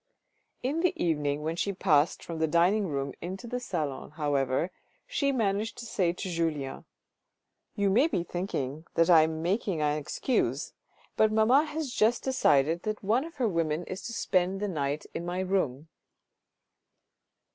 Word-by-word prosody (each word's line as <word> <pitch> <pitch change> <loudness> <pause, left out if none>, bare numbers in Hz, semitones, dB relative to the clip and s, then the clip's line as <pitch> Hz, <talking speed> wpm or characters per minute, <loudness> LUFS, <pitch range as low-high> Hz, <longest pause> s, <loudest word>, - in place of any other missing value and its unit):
In 280 +6 0
the 360 +1 +2
evening 150 -3 0
when 160 +1 -1
she 200 +3 -1
passed 165 -5 +2
from 165 -1 -6
the 160 - +2
dining 180 +6 +3
room 140 -3 -2
into 190 +6 -6
the 245 +1 -3
salon, 155 - -3
however, 145 +1 0 0.3
she 285 - 0
managed 220 -3 0
to 235 - -7
say 190 -6 +1
to 180 - -6
Julien: 160 -6 -2 0.9
"You 200 -1 +2
may 250 +10 +5
be 180 - -1
thinking 160 -5 -4
I 165 -1 +7
am 160 0 -1
making 190 -1 0
an 150 0 +1
excuse, 150 - -1 0.4
but 215 0 +4
mamma 230 +7 +4
has 300 -4 -4
just 230 +3 +2
decided 165 - +3
that 215 +1 -4
one 225 +7 +2
of 330 - -10
her 255 -5 +1
women 165 -3 0
is 185 +2 -6
to 230 - -6
spend 185 -2 +1
the 205 - -1
night 145 -4 -2
in - - -4
my 175 +1 -3
room." 165 -7 -1
175 Hz, 160 wpm, -29 LUFS, 155-215 Hz, 0.9 s, I